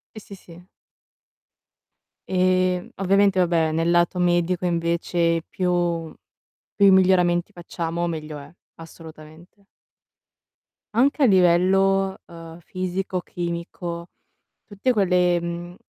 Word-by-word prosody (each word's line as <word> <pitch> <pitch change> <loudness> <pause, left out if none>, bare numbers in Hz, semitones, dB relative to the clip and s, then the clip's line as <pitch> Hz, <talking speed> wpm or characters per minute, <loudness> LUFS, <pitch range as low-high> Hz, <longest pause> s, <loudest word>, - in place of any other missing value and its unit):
Sì, - - -7
sì, 200 -1 -12
sì. 175 -2 -16 1.6
Ehm, 185 -1 +1
ovviamente, 195 0 +2
vabbè, 165 -3 +1
nel 165 +1 0
lato 175 +1 +2
medico 175 0 0
invece 170 -1 0
più 175 -3 -1 0.6
più 200 -2 +6
miglioramenti 180 -2 +3
facciamo 170 -1 -4
meglio 155 -2 -6
è, 145 +2 -13 0.3
assolutamente. 165 +3 -14 1.3
Anche 275 +5 +2
a - - +6
livello, 190 0 +3
ehm, 165 -1 -12
fisico, 185 +1 -4
chimico, 170 0 -6 0.6
tutte 215 +4 -1
quelle, 180 -4 +2
mhmm, 170 +1 -6
175 Hz, 100 wpm, -22 LUFS, 170-185 Hz, 1.6 s, più